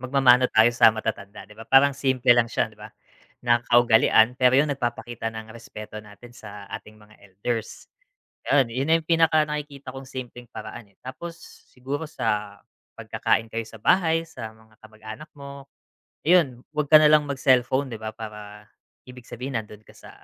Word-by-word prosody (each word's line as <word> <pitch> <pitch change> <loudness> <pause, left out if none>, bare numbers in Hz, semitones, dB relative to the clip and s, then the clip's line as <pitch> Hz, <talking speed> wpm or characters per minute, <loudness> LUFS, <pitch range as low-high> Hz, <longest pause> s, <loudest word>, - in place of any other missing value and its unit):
magmamano 130 -1 +4
tayo 110 +1 +6
sa 120 - +6
matatanda 105 -3 -6
'di - - -15
ba 115 - -10
parang 135 +1 +5
simple 130 -3 +3
lang 120 - +4
siya - - -1
'di - - -21
ba - - -9 0.6
na 120 -1 +3
kaugalian 115 -1 +5
pero 125 0 +4
yung 150 - +2
nagpapakita 120 -3 -4
ng 110 0 -8
respeto 110 -2 -11
natin 105 +4 -15
sa 100 -3 -11
ating 105 - -12
mga 105 0 -20
elders. 105 +4 -5 0.6
Gano'n, 135 -4 +3
yun 130 +4 -2
na 160 - +4
yung 165 - -1
pinaka 165 -2 +3
nakikita 145 -3 -6
kong 135 0 -10
simpleng 125 -2 -9
paraan 110 -1 -10
eh. 100 - -30
Tapos 165 +6 -8 0.3
siguro 140 +5 -6
sa 105 -7 -3 0.4
pagkakain 110 0 -1
kayo 115 -1 -4
sa 115 - -14
bahay, 165 - +2
sa 115 -9 -10
mga 110 -1 -24
kamag-anak 110 +6 -11
mo, 140 -1 -11 0.6
ayun 155 -8 +2
wag 150 -1 -2
ka 155 - +10
nalang 150 -1 +4
mag-cellphone 130 0 +2
'di - - -7
ba 110 - -4
para 105 -1 -10 0.4
ibig 125 0 -12
sabihin 130 +3 -7
nandun 110 -2 -6
ka - - -18
sa - - -15
120 Hz, 170 wpm, -24 LUFS, 110-140 Hz, 0.6 s, ka